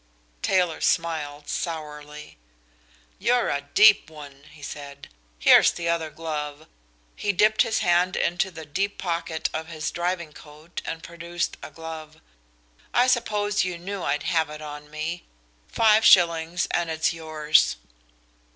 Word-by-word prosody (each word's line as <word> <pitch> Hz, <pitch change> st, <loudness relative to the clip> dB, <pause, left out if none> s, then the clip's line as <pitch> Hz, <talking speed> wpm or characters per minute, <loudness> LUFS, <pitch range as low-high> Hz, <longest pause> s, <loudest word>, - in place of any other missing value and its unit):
Taylor 180 Hz, -4 st, +1 dB
smiled 150 Hz, -3 st, -1 dB
sourly. 150 Hz, -3 st, -6 dB, 0.8 s
"You're 245 Hz, 0 st, +2 dB
a 140 Hz, -, -1 dB
deep 200 Hz, +7 st, +5 dB
one," 145 Hz, -2 st, -12 dB
he 150 Hz, -1 st, -16 dB
said. 140 Hz, 0 st, -9 dB, 0.3 s
"Here's -, -, +7 dB
the 170 Hz, -1 st, -3 dB
other 165 Hz, -2 st, 0 dB
glove." 155 Hz, -1 st, -5 dB, 0.5 s
He 205 Hz, -, 0 dB
dipped 215 Hz, +3 st, +3 dB
his 220 Hz, -, +1 dB
hand 175 Hz, +1 st, +3 dB
into 175 Hz, +2 st, 0 dB
the 165 Hz, -3 st, -10 dB
deep 195 Hz, +8 st, -2 dB
pocket 170 Hz, -3 st, -2 dB
of 160 Hz, 0 st, -4 dB
his 155 Hz, -2 st, -4 dB
driving 175 Hz, -2 st, -3 dB
coat 155 Hz, +3 st, -10 dB
and 165 Hz, 0 st, -5 dB
produced 170 Hz, 0 st, -4 dB
a -, -, -8 dB
glove. 160 Hz, 0 st, -9 dB, 0.8 s
"I 245 Hz, -, +5 dB
suppose 210 Hz, -4 st, +1 dB
you 180 Hz, -1 st, -3 dB
knew 195 Hz, +3 st, -6 dB
I'd 150 Hz, -, -1 dB
have 160 Hz, -2 st, +1 dB
it 150 Hz, 0 st, -8 dB
on 150 Hz, 0 st, -9 dB
me. 155 Hz, +3 st, -4 dB, 0.4 s
Five 220 Hz, -1 st, +4 dB
shillings, 170 Hz, -1 st, +4 dB
and 170 Hz, -1 st, 0 dB
it's 160 Hz, +1 st, 0 dB
yours." 155 Hz, -1 st, +2 dB
165 Hz, 140 wpm, -25 LUFS, 150-175 Hz, 0.8 s, Here's